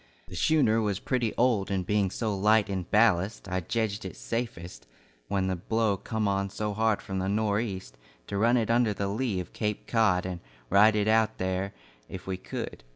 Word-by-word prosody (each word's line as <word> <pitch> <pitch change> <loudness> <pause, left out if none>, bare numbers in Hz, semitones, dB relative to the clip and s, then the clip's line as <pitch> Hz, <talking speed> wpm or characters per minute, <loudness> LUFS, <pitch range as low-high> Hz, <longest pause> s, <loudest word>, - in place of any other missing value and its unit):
The - - -8
schooner 115 - +3
was 100 -3 -1
pretty 120 -4 0
old 115 -6 +2
and 95 -2 -1
being 105 0 +1
so 110 +1 -2
light 105 +1 +3
in 95 -3 -3
ballast, 105 -2 +2
I 95 -1 -1
jedged 105 +3 -2
it 95 -3 -7
safest, 85 - -5 0.4
when 95 0 0
the 95 0 0
blow 110 +3 0
come 110 +2 -2
on 100 0 0
so 105 +1 -3
hard 110 0 +1
from 95 -1 -3
the 95 +1 -1
nor' 105 0 +1
east, 95 - -5 0.3
to 100 - -5
run 120 +3 +4
it 115 -1 +1
under 115 -3 +2
the 100 - -2
lee 110 -2 -1
of 90 - -7
Cape 105 -2 -2
Cod 105 -6 +2
and 90 -2 -4 0.3
ride 105 +3 +6
it 105 0 +1
out 110 0 +3
there 95 +1 -2 0.3
if 95 0 -8
we 95 - -2
could. 90 -8 -6
100 Hz, 200 wpm, -28 LUFS, 95-110 Hz, 0.4 s, ride